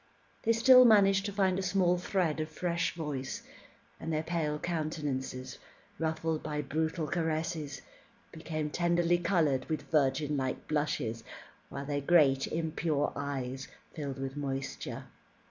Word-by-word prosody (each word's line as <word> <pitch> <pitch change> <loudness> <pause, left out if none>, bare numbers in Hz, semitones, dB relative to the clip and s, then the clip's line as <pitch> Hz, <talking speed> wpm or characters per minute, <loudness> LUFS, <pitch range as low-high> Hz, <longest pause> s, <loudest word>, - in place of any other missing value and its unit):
They 230 - +2
still 255 +3 +8
managed 200 -3 +5
to - - -3
find 190 -2 +1
a - - 0
small 185 -1 +2
thread 180 -4 0
of 155 0 -2
fresh 170 +1 -1
voice, 150 -5 -4 0.6
and 165 - -4
their 155 0 0
pale 160 -3 -1
countenances, 150 -6 -3 0.4
ruffled 160 0 -1
by 150 0 -3
brutal 160 +3 -1
caresses, 155 -2 -2 0.5
became 155 -2 -4
tenderly 175 +1 +2
coloured 160 -7 +1
with 155 - -3
virgin 150 0 +2
like 130 -2 -2
blushes, 145 -7 -1 0.5
while 140 0 -6
their 145 0 -1
great 140 -4 +4
impure 160 -2 -1
eyes 135 -2 -4 0.3
filled 140 -4 -5
with 135 0 -4
moisture. 135 -2 -4
155 Hz, 130 wpm, -31 LUFS, 140-170 Hz, 0.6 s, still